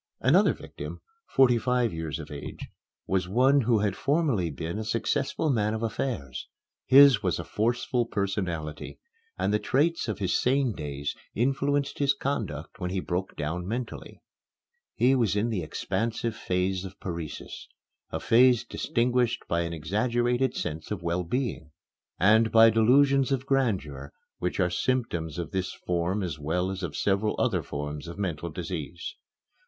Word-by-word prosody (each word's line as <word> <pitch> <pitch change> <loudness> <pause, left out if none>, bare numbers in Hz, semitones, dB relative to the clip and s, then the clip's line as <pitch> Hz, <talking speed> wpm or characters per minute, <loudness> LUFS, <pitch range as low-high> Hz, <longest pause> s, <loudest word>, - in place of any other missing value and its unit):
Another - - +5
victim, - - -8 0.3
forty 125 -3 +4
five 125 -3 +1
years 80 -2 -4
of 75 -2 -9
age, 70 -1 -7 0.4
was 95 -1 0
one 130 +7 +4
who 115 -1 +3
had 100 -2 0
formerly 135 - +1
been 80 +6 -4
a - - -3
successful 135 +6 0
man 110 -3 +1
of 110 - -4
affairs. 105 - -3 0.4
His 135 -4 +8
was 90 -5 0
a - - -4
forceful 120 +2 0
personality, 90 -8 -3 0.4
and - - 0
the 105 - +3
traits 155 +7 +1
of 110 - -2
his 95 -4 0
sane 130 -2 +2
days 75 -3 -4 0.2
influenced 140 +3 0
his 140 -1 +3
conduct 100 - -4
when 90 -2 -2
he 95 +1 -1
broke 90 +1 -3
down 85 +4 -3
mentally. 120 +4 -5 0.7
He 125 +2 +4
was 115 -7 +2
in 105 +3 +1
the 100 -5 -1
expansive 115 +7 -2
phase 90 0 -1
of 95 0 -9
paresis, 85 -4 -6 0.4
a - - -3
phase 125 0 +5
distinguished 120 0 0
by 85 - 0
an 85 0 -3
exaggerated 120 - 0
sense 80 -1 -4
of 100 -5 -4
well 85 +1 0
being, 120 - -3 0.5
and 110 +3 +5
by 115 0 +7
delusions 135 +4 +4
of 130 -1 0
grandeur 95 - -1 0.3
which 90 +2 -2
are 90 -2 +2
symptoms 85 - -1
of 85 -3 -4
this 95 -1 -2
form 90 +3 -1
as 80 -4 -4
well 90 +5 -1
as 95 0 -5
of 85 -6 -4
several 100 +2 +1
other - - +1
forms 75 +2 -5
of 85 - -8
mental 85 -4 -3
disease. 80 0 -5
105 Hz, 155 wpm, -27 LUFS, 85-125 Hz, 0.7 s, His